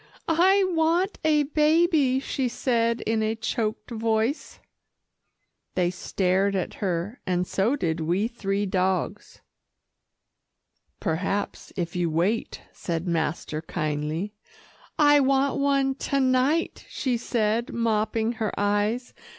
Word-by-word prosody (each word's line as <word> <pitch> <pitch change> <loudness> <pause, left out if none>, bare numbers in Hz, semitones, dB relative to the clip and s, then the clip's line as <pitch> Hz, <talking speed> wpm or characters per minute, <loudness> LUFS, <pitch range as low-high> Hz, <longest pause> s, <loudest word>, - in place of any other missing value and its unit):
"I 375 +5 +4
want 345 +3 +1
a 305 -1 +4
baby," 300 -2 +3
she 265 -1 -2
said 235 -1 0
in 220 0 0
a 220 +1 0
choked 225 0 -3
voice. 225 +4 -1 1.2
They 180 -1 +2
stared 190 +2 0
at 185 - -2
her, 190 +5 -2
and 180 -1 +1
so 205 +9 +1
did 165 - -1
we 175 +7 0
three 205 -4 -2
dogs. 185 -2 -1 1.6
"Perhaps, 195 +5 -2
if 175 -1 -3
you 175 -1 0
wait," 180 +8 -1
said 170 0 -3
master 160 -2 -1
kindly. 155 +4 -3 0.6
"I 290 -1 +6
want 275 0 +2
one 275 -1 +2
to 275 +1 -1
night," 260 +5 +1
she 255 -3 -1
said 230 -1 0
mopping 225 0 0
her 220 -3 -2
eyes. 205 +4 0
225 Hz, 115 wpm, -25 LUFS, 185-270 Hz, 1.6 s, I